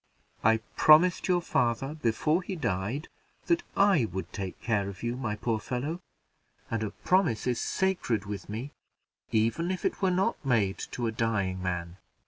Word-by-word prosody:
"I 110 Hz, 0 st, +4 dB
promised 165 Hz, +4 st, +6 dB
your 180 Hz, -2 st, +2 dB
father, 125 Hz, 0 st, 0 dB
before 155 Hz, +4 st, +1 dB
he 190 Hz, +1 st, -5 dB
died, 120 Hz, -, -2 dB, 0.4 s
that 340 Hz, 0 st, +2 dB, 0.2 s
I 195 Hz, -, +5 dB
would 95 Hz, -2 st, -6 dB
take 95 Hz, -3 st, -5 dB
care 105 Hz, -4 st, 0 dB
of 100 Hz, +2 st, -10 dB
you, 120 Hz, +1 st, -1 dB
my 120 Hz, -5 st, -2 dB
poor 110 Hz, +1 st, -1 dB
fellow; 140 Hz, +10 st, -3 dB, 0.7 s
and 115 Hz, -1 st, 0 dB
a 110 Hz, -, -1 dB
promise 175 Hz, -, +1 dB
is 125 Hz, -2 st, 0 dB
sacred 175 Hz, -, 0 dB
with 100 Hz, 0 st, -6 dB
me, 115 Hz, +7 st, -5 dB, 0.6 s
even 115 Hz, +10 st, +1 dB
if 185 Hz, -1 st, -3 dB
it -, -, -1 dB
were 190 Hz, -, +3 dB
not 190 Hz, +3 st, 0 dB
made 110 Hz, -8 st, +1 dB, 0.2 s
to 120 Hz, -, -1 dB
a 115 Hz, -, 0 dB
dying 105 Hz, -5 st, -1 dB
man. 90 Hz, -1 st, -3 dB
120 Hz, 165 wpm, -29 LUFS, 105-165 Hz, 0.7 s, promised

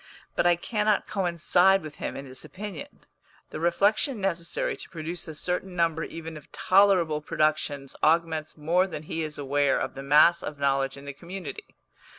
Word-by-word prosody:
But -, -, +3 dB
I 175 Hz, -, +5 dB
cannot 210 Hz, +3 st, 0 dB
coincide 180 Hz, 0 st, +3 dB
with 155 Hz, -1 st, -9 dB
him -, -, -4 dB
in 135 Hz, -, -7 dB
this 130 Hz, 0 st, -8 dB
opinion. 195 Hz, -5 st, -9 dB, 0.5 s
The -, -, -5 dB
reflection 205 Hz, -, +2 dB
necessary 175 Hz, -4 st, -1 dB
to -, -, -9 dB
produce 170 Hz, +2 st, -5 dB
a 160 Hz, -, -7 dB
certain 180 Hz, +3 st, -3 dB
number 165 Hz, -2 st, +1 dB
even 165 Hz, -1 st, -7 dB
of 150 Hz, -, -15 dB
tolerable 185 Hz, -6 st, +3 dB
productions 150 Hz, -3 st, -1 dB
augments 160 Hz, -1 st, +1 dB
more 170 Hz, +5 st, +2 dB
than 155 Hz, -5 st, -7 dB
he 160 Hz, +1 st, -4 dB
is 155 Hz, -1 st, -3 dB
aware 145 Hz, 0 st, +1 dB
of -, -, -3 dB
the 135 Hz, -, -7 dB
mass 150 Hz, +5 st, +5 dB
of 150 Hz, -, -6 dB
knowledge 135 Hz, -1 st, 0 dB
in 140 Hz, -, -11 dB
the 140 Hz, -, -6 dB
community. 185 Hz, -, -8 dB
165 Hz, 170 wpm, -27 LUFS, 150-185 Hz, 0.5 s, I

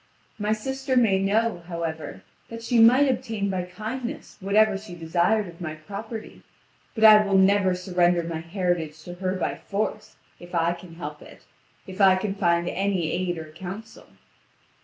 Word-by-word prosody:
My 210 Hz, +1 st, 0 dB
sister 265 Hz, +4 st, -1 dB
may 210 Hz, -6 st, +4 dB
know, 210 Hz, 0 st, +1 dB
however, 165 Hz, -2 st, -5 dB, 0.3 s
that 230 Hz, 0 st, -8 dB
she 235 Hz, 0 st, +2 dB
might 250 Hz, +5 st, +7 dB
obtain 225 Hz, -6 st, -1 dB
by 185 Hz, -2 st, -2 dB
kindness 230 Hz, +9 st, -6 dB
whatever 210 Hz, +2 st, +3 dB
she 195 Hz, -2 st, -8 dB
desired 175 Hz, +5 st, +1 dB
of 170 Hz, 0 st, -12 dB
my 155 Hz, -2 st, -4 dB
property; 205 Hz, +8 st, -8 dB, 0.5 s
but 220 Hz, -, -1 dB
I 215 Hz, -1 st, +9 dB
will 200 Hz, -1 st, +2 dB
never 190 Hz, -1 st, +4 dB
surrender 180 Hz, -1 st, +1 dB
my 165 Hz, -1 st, -4 dB
heritage 165 Hz, -3 st, -2 dB
to 175 Hz, -, -8 dB
her 185 Hz, +1 st, -2 dB
by 185 Hz, -, -1 dB
force, 210 Hz, +1 st, -4 dB, 0.2 s
if 175 Hz, 0 st, -9 dB
I 170 Hz, 0 st, +2 dB
can 175 Hz, -1 st, -12 dB
help 150 Hz, -3 st, -7 dB
it, -, -, -15 dB, 0.4 s
and 190 Hz, -, -9 dB
if 205 Hz, -, -3 dB
I 190 Hz, -1 st, +7 dB
can 195 Hz, +1 st, -2 dB
find 170 Hz, -3 st, +1 dB
any 190 Hz, -4 st, -1 dB
aid 175 Hz, -1 st, -1 dB
or 160 Hz, -1 st, -8 dB
counsel." 190 Hz, +6 st, -9 dB
190 Hz, 170 wpm, -25 LUFS, 175-215 Hz, 0.5 s, I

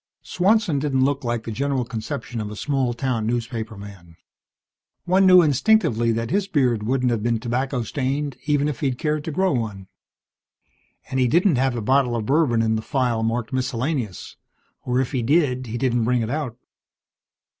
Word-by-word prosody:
Swanson 190 Hz, -4 st, +1 dB
didn't 135 Hz, -2 st, +1 dB
look 140 Hz, -1 st, -1 dB
like 120 Hz, -2 st, -2 dB
the 115 Hz, -, -5 dB
general 135 Hz, +2 st, -1 dB
conception 120 Hz, 0 st, -5 dB
of 105 Hz, -, -5 dB
a 105 Hz, -, -7 dB
small 135 Hz, +1 st, -1 dB
town 120 Hz, -2 st, -2 dB
newspaperman. 110 Hz, -7 st, -5 dB, 0.9 s
One 190 Hz, +2 st, +4 dB
knew 185 Hz, -1 st, +8 dB
instinctively 145 Hz, -, +2 dB
that 115 Hz, 0 st, -2 dB
his 200 Hz, +1 st, +1 dB
beard 130 Hz, -, +1 dB
wouldn't 125 Hz, +3 st, 0 dB
have 115 Hz, -3 st, -1 dB
been 115 Hz, 0 st, 0 dB
tobacco 125 Hz, +2 st, -2 dB
stained 140 Hz, +3 st, -2 dB
even 145 Hz, -1 st, +2 dB
if 150 Hz, -5 st, -3 dB
he'd 135 Hz, -4 st, -1 dB
cared 150 Hz, +1 st, -1 dB
to 160 Hz, -, -3 dB
grow 190 Hz, +4 st, +1 dB
one. 105 Hz, -7 st, -3 dB, 1.3 s
And 130 Hz, -, 0 dB
he 125 Hz, -, +3 dB
didn't 170 Hz, -, +3 dB
have 130 Hz, 0 st, +1 dB
a 115 Hz, -, -3 dB
bottle 130 Hz, 0 st, +2 dB
of 110 Hz, -2 st, -2 dB
bourbon 135 Hz, -5 st, +2 dB
in 110 Hz, 0 st, +1 dB
the -, -, -3 dB
file 125 Hz, -3 st, 0 dB
marked 115 Hz, +1 st, -2 dB
Miscellaneous, 130 Hz, -, -3 dB, 0.5 s
or 125 Hz, 0 st, +1 dB
if 130 Hz, -, -1 dB
he 130 Hz, -4 st, -1 dB
did 130 Hz, -1 st, +1 dB
he 115 Hz, +2 st, -4 dB
didn't 120 Hz, -3 st, +1 dB
bring 125 Hz, 0 st, +1 dB
it 110 Hz, -, -3 dB
out. 140 Hz, -6 st, -3 dB
125 Hz, 175 wpm, -22 LUFS, 115-145 Hz, 1.3 s, knew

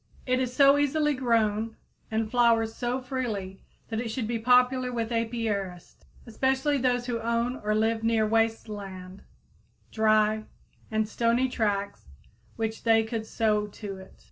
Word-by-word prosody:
It 255 Hz, 0 st, +1 dB
is 255 Hz, -1 st, -1 dB
so 275 Hz, +2 st, +5 dB
easily 295 Hz, +1 st, +2 dB
grown 225 Hz, -4 st, 0 dB, 0.3 s
and 220 Hz, 0 st, -1 dB
flowers 230 Hz, -2 st, +3 dB
so 245 Hz, +1 st, -2 dB
freely 230 Hz, -8 st, -4 dB, 0.3 s
that 225 Hz, 0 st, -2 dB
it 235 Hz, -, -4 dB
should 225 Hz, 0 st, -3 dB
be 230 Hz, 0 st, -2 dB
popular 250 Hz, +2 st, +3 dB
with 230 Hz, -1 st, -3 dB
apiarists, 220 Hz, -6 st, -3 dB, 0.2 s
especially 265 Hz, +4 st, 0 dB
those 245 Hz, -1 st, +1 dB
who 240 Hz, -2 st, -2 dB
own 235 Hz, +2 st, -1 dB
or 215 Hz, 0 st, -1 dB
live 220 Hz, +1 st, +1 dB
near 225 Hz, -1 st, +2 dB
waste 225 Hz, +1 st, +1 dB
land, 195 Hz, -2 st, -8 dB, 0.7 s
dry 215 Hz, 0 st, +2 dB, 0.4 s
and 220 Hz, 0 st, 0 dB
stony 235 Hz, +3 st, +1 dB
tracts 205 Hz, -5 st, -2 dB, 0.5 s
which 225 Hz, -1 st, -3 dB
they 225 Hz, -1 st, +4 dB
could 220 Hz, 0 st, -4 dB
sow 210 Hz, -2 st, +1 dB
to 205 Hz, -1 st, -8 dB
it. 190 Hz, 0 st, -13 dB
225 Hz, 145 wpm, -27 LUFS, 215-245 Hz, 0.7 s, so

